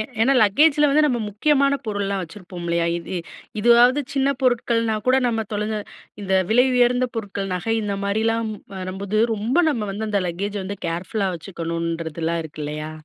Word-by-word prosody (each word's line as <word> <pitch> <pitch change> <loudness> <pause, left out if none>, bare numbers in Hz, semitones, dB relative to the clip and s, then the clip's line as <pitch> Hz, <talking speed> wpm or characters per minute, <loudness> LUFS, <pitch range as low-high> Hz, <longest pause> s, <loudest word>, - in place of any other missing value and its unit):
ஏ - - +2 0.2
ஏனா 260 +4 +4
லக்கேஜில 295 +8 +4
வந்து 300 +2 +4
நம்ம 250 -5 0
முக்கியமான 280 +6 +2
பொருள்லாம் 200 -2 -1
வச்சுருப்போம் 175 0 -9
இல்லையா? 170 0 +1
இது 170 +2 -6 0.4
இதுவாது 240 +4 +5
சின்ன 270 0 +2
பொருட்கள்னா 230 -3 +1
கூட 255 +1 +5
நம்ம 225 -2 0
தொலைஞ்ச 210 +1 -2 0.4
இந்த 190 -1 0 0.2
விலை 245 +3 +5
உயர்ந்த 250 +1 +3
பொருட்கள், 200 -3 -4
நகை 225 +5 -1
இந்த 200 -1 -2
மாரிலாம் 220 +2 0 0.3
வரும்போது 190 +2 -3 0.2
ரொம்ப 220 +7 -2
நம்ம 220 -7 -2
வந்து 215 +2 -4
அந்த 200 -1 +1
லக்கேஜ 200 +4 -4
வந்து 200 +1 -5
கேர்ஃபுல்லா 190 +4 -2
வச்சுக்கணுன்றதுலாம் 165 -1 -3
இருக்கு 155 -1 -8
இல்லையா? 150 +1 -5
205 Hz, 155 wpm, -22 LUFS, 180-240 Hz, 0.4 s, இதுவாது